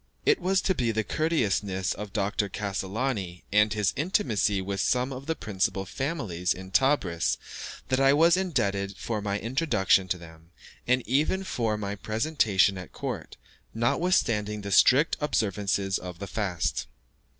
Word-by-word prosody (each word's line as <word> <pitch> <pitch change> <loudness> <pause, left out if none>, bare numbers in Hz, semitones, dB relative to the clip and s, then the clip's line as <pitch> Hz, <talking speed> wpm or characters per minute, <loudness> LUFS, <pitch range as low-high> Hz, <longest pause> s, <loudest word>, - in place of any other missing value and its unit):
It 435 - +4
was 190 0 +1
to 190 - +1
the 115 - 0
courteousness 105 - 0
of 105 -1 -7
Dr. 100 0 -1
Cassolani, 100 -1 -3
and 105 +1 +4
his 105 -2 +1
intimacy 130 - +1
with 100 +1 -3
some 125 +5 +1
of 130 +2 -8
the 160 - 0
principal 95 - -1
families 100 - -2
in 95 0 -10
Tebris, 95 - +2 0.5
that 130 0 +2
I 135 0 +5
was 165 +4 +5
indebted 100 - -1
for 110 -3 -3
my 100 -1 -1
introduction 115 - +2
to 90 - -1
them, 80 -1 -14 0.4
and 125 0 +1
even 155 +9 +1
for 115 - -1
my 100 -1 -3
presentation 105 -4 +1
at 90 - -9
court, - - -5 0.4
notwithstanding 115 - +1
the 100 0 -6
strict 130 - +5
observance 105 -8 0 0.2
of 90 -1 -8
the 100 - -6
fast. 90 - -2
105 Hz, 145 wpm, -27 LUFS, 95-135 Hz, 0.5 s, I